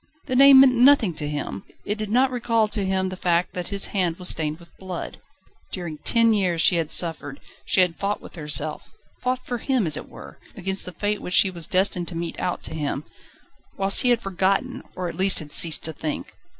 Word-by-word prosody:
The 255 -4 -3
name 275 0 +8
meant 265 -2 +5
nothing 245 -6 +4
to 150 -1 -3
him! 150 +5 -5 0.2
It 210 +1 -3
did 215 -1 -4
not 255 +4 +2
recall 230 -3 0
to 210 -2 -1
him 190 0 -1
the 185 - -6
fact 175 -1 -1
that 180 -1 -5
his 200 -1 +1
hand 180 -4 -1
was 180 - -2
stained 155 0 -2
with 170 -1 -19
blood. 185 -2 -7 0.5
During 170 -5 -6
ten 230 -1 +3
years 185 -5 0
she 175 +1 +3
had 160 -2 -2
suffered, 150 -6 -1 0.3
she 190 - +3
had 180 -2 0
fought 200 +1 -2
with - - -14
herself, 150 -1 -2 0.3
fought 255 0 -2
for 245 -1 -4
him 255 -4 0
as 155 -2 +2
it - - -9
were, - - -13 0.2
against 190 0 -3
the 180 - -7
Fate 205 +4 -3
which 180 - -1
she 190 - +4
was 170 -3 -6
destined 185 -2 0
to 175 - -5
mete 170 0 -5
out 180 - -3
to - - -6
him, 150 -2 -3 0.7
whilst 195 0 +5
he 250 - +1
had 235 -1 +1
forgotten, 195 0 -1
or 180 -1 -4
at 170 - -5
least 190 +3 +3
had 150 -2 +1
ceased 165 -3 +5
to 160 - 0
think. 155 0 -6
185 Hz, 220 wpm, -23 LUFS, 165-215 Hz, 0.7 s, name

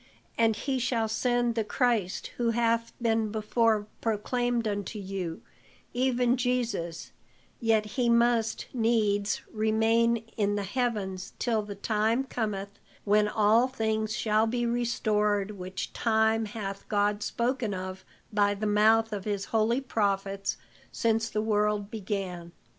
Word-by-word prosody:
And 225 -1 +3
he 265 +4 -2
shall 235 -3 0
send 240 +2 +1
the 225 -1 0
Christ 215 -4 0
who 235 -1 +1
hath 230 0 +1
been 225 -2 +1
before 220 0 +1 0.2
proclaimed 235 +2 0
unto 205 0 -3
you, 190 -4 -5 0.5
even 250 0 +2
Jesus; 240 -10 -2 0.5
yet 225 -2 +2
he 235 +3 0
must 235 -1 +2
needs 220 -4 +1
remain 225 +1 +2
in 205 -1 +1
the 205 - -1
heavens 200 -4 -2
till 225 -3 +1
the 205 -1 -7
time 220 +4 +1
cometh 205 -6 -4 0.2
when 210 0 +3
all 215 +3 +4
things 220 -3 -1
shall 215 0 +2
be 240 +1 -1
restored, 210 -4 +1
which 185 -2 -6
time 220 0 +2
hath 205 -2 -6
God 205 0 +1
spoken 240 0 -1
of 185 0 -6 0.3
by 205 -1 +3
the 210 +2 -3
mouth 220 +2 +4
of 200 -2 -4
his 200 -2 -2
holy 225 +4 +2
prophets 200 -5 -1 0.3
since 225 0 +1
the 215 0 -1
world 210 -1 +1
began. 185 -5 -4
220 Hz, 130 wpm, -28 LUFS, 205-235 Hz, 0.5 s, all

